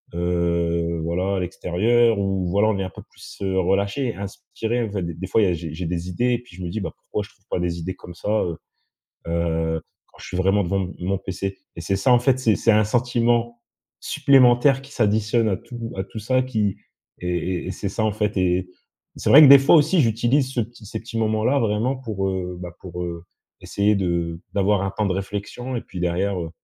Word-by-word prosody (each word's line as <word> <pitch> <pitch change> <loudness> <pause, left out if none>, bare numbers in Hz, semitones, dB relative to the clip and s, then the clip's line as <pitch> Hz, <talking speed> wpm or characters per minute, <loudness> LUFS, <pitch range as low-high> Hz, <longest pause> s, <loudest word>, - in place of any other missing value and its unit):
heu, 85 -1 0
voilà 90 +4 -1
à - - 0
l'extérieur 105 +6 +2
ou 95 -2 -1
voilà, 100 +4 +3
on 105 - 0
est 95 - -1
un 95 - -4
peu - - -11
plus, - - -13
heu, 95 -1 -1
relâché, 100 +7 0
inspiré, 110 +4 -4
en 110 - -4
fait. 100 -3 -2
D 85 0 -4
des 95 +3 -6
fois, 110 - +2
il 105 - +4
y - - +3
a - - +1
j'ai 80 -2 -5
j'ai 90 +2 -5
des 90 +1 -3
idées 120 +6 +1
et 120 - 0
puis 120 -7 -17
je - - -9
me - - -3
dis: 110 +3 -3
«Bah - - -4
pourquoi 105 - -4
je - - -13
trouve 95 - -29
pas - - -1
des 85 -1 -2
idées 90 +2 -4
comme 90 - -11
ça, 90 - -5
heu 85 -2 -4 0.7
heu, 80 -1 -1 0.3
quand - - -23
je - - -10
suis 90 - -4
vraiment 95 +2 +2
devant 95 +2 0
devant 90 0 -5
m 90 - -4
mon 95 - +1
PC» 95 0 -4 0.2
et 85 - -6
c'est 95 +4 -1
ça 125 +6 +3
en 120 - +6
fait, 130 +1 +2
c'est 115 -5 +3
c'est 115 - +3
un 105 0 +4
sentiment 120 0 +1 0.4
supplémentaire 135 0 +4
qui 135 - -14
s'additionne 110 0 +2
à 95 - 0
tout 115 0 -8
à 95 - -1
tout 110 - -8
ça 130 +4 +1
qui 110 -6 -1 0.4
et 90 0 -2
et 95 - -2
c'est 100 +2 -4
ça 110 +3 -1
en 110 - 0
fait. 105 -1 -1
Et 90 0 +1 0.5
c'est - - -1
vrai 150 - +10
que 145 - +10
des 140 0 +10
fois 135 - +5
aussi, 165 +3 +4
j'utilise 125 +3 +1
ce 120 - +1
petit 115 -1 -9
ces 110 +2 -5
petits 115 0 -6
moments 110 0 +1
là, 140 +2 +3
vraiment 115 +4 0
pour, 105 -6 -3
heu, 90 -1 -3
bah, 90 -1 -6
pour, 90 -1 -6
heu, 85 -1 -6 0.4
essayer 105 +1 +1
de 85 -3 -1
d'avoir 100 0 +2
un 95 - -2
temps 105 +2 -1
de - - 0
réflexion 105 +6 -4
et - - -4
puis 90 - -9
derrière, 90 +2 0
heu, 80 -2 -4
100 Hz, 240 wpm, -23 LUFS, 90-115 Hz, 0.7 s, vrai